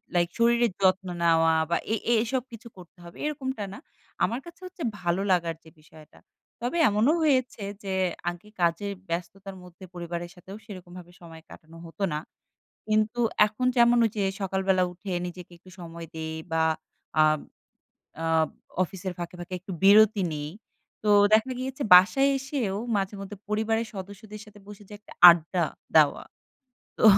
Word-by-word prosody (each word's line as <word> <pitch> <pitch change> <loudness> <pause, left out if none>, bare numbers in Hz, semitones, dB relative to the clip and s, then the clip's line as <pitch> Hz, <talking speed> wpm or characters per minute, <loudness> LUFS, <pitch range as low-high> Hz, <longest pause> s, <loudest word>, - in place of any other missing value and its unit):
Like 175 -1 +2
শরীরের 235 -1 +3
যত্ন 190 0 +2 0.2
নেওয়া 165 -1 +4 0.2
বা 170 - +2 0.2
এ - - +3 0.2
এ - - +5
এসব 255 +2 -1
কিছু 230 0 -11
করতে 180 -1 -15
হবে, 170 0 -13
এরকমটা 265 -6 -3
না। - - -9 0.4
আমার 230 +6 0
কাছে 340 -1 -13
হচ্ছে, 365 -2 -8 0.2
ভালো 175 +2 0
লাগার 170 -2 +1
যে 160 - -15
বিষয়টা। 155 0 -18 0.4
তবে 245 +8 -2
এমনও 215 +8 +3
হয়েছে 255 -7 +1 0.2
যে, 195 -1 -3 0.4
আগে 175 +4 -10
কাজের 175 +4 0 0.2
ব্যস্ততার 190 +3 -5
মধ্যে 180 +1 -15
পরিবারের 175 0 -6
সাথেও 185 +2 -11
সেরকমভাবে 180 -3 -11
সময় 165 -1 -12
কাটানো 160 +1 -14
হতো 165 +4 -7
না। 150 - -1 0.7
কিন্তু 215 +2 +1 0.3
এখন 220 +4 -4
যেমন 240 0 +5
ওইযে 215 -2 -2 0.2
সকালবেলা 190 -1 +1
উঠে 190 +2 -8 0.2
নিজেকে 180 0 -10
একটু 185 - -18
সময় 170 -1 -8
দেই 160 0 -5 0.2
বা 160 0 +2 0.6
আব 155 0 +3 0.9
আব 160 -1 +2 0.3
অফিসের 185 0 -5
ফাঁকে, 175 0 -6
ফাঁকে 175 +1 -9
একটু 190 +2 -8
বিরতি 210 +1 +6
নেই। 150 0 -5 0.5
তো 210 - +2 0.2
দেখা 220 +4 +3
গিয়েছে, 265 +2 -4
বাসায় 210 +10 +6
এসেও 265 -7 -3 0.2
মাঝেমধ্যে 195 0 -4
পরিবারের 220 +2 0
সদস্যদের 205 +2 -9
সাথে 210 -2 -16
বসে 210 0 -12
যে, - - -14
একটা 210 - -16 0.2
আড্ডা 170 +1 +4 0.3
দেওয়া। 150 -2 +3 0.8
তো, - - +2
190 Hz, 150 wpm, -26 LUFS, 170-220 Hz, 0.9 s, বিরতি